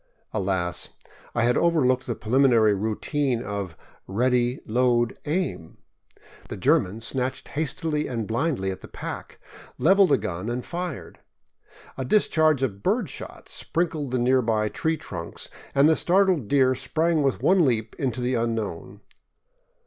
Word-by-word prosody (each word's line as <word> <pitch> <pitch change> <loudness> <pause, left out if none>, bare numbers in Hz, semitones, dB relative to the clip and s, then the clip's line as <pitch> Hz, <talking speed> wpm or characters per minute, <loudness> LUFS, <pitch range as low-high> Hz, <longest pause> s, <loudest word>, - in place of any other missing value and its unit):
Alas! 95 -2 -1 0.5
I 120 - +2
had 120 +1 +3
overlooked 130 -7 +2
the 120 - -2
preliminary 115 -2 +4
routine 115 +5 -1
of 100 -5 -5 0.3
Ready! 125 +4 +1
Load! 120 0 +1
Aim! 155 - -2 0.4
" - - -23
The - - -5
German 105 +5 +2
snatched 130 +2 -3
hastily 155 0 -1
and 115 -3 -3
blindly 115 -4 -1
at 95 - -8
the - - -10
pack, - - -7 0.4
leveled 195 -1 +5
a - - +5
gun, 90 +5 -4
and 120 +1 -3
fired. 175 -4 -5 0.8
A - - -1
discharge 155 -3 +3
of 100 -6 -2
bird 205 - 0
shot - - -9
sprinkled 160 -4 -2
the 130 - 0
nearby 120 -4 +2
tree 160 +7 -1
trunks, 85 - -7 0.3
and 140 +2 +6
the 160 - +5
startled 180 - +2
deer 130 -1 +4
sprang 160 +4 0
with 130 -6 0
one 185 +3 +5
leap 115 -5 0
into 125 -3 -1
the 125 +1 0
unknown. 110 -5 -3
125 Hz, 140 wpm, -25 LUFS, 110-150 Hz, 0.8 s, and